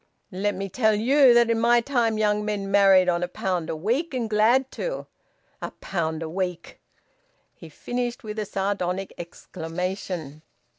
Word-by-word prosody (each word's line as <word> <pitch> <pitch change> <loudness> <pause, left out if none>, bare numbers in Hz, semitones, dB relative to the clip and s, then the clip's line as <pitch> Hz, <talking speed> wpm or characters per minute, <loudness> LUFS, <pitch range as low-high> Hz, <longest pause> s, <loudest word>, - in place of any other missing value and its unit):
"Let 200 +2 -1
me 195 +1 -4
tell 220 +2 +2
you 260 +5 +5
that 235 -1 +5
in 230 - +1
my 240 +1 +4
time 235 -3 0
young 210 -1 +1
men 205 -2 -3
married 195 -2 +6
on 175 -1 +1
a 180 - -1
pound 180 -2 -3
a - - -2
week, 250 - -1
and 240 -3 -1
glad 230 +5 +3
to! - - -4 0.6
A - - -4
pound 160 -3 -2
a - - -4
week!" 180 +1 -4 0.7
He 165 - -13
finished 245 - -4
with 215 0 -5
a 210 - -2
sardonic 195 -1 -2
exclamation. 170 -2 -5
200 Hz, 160 wpm, -25 LUFS, 180-230 Hz, 0.7 s, married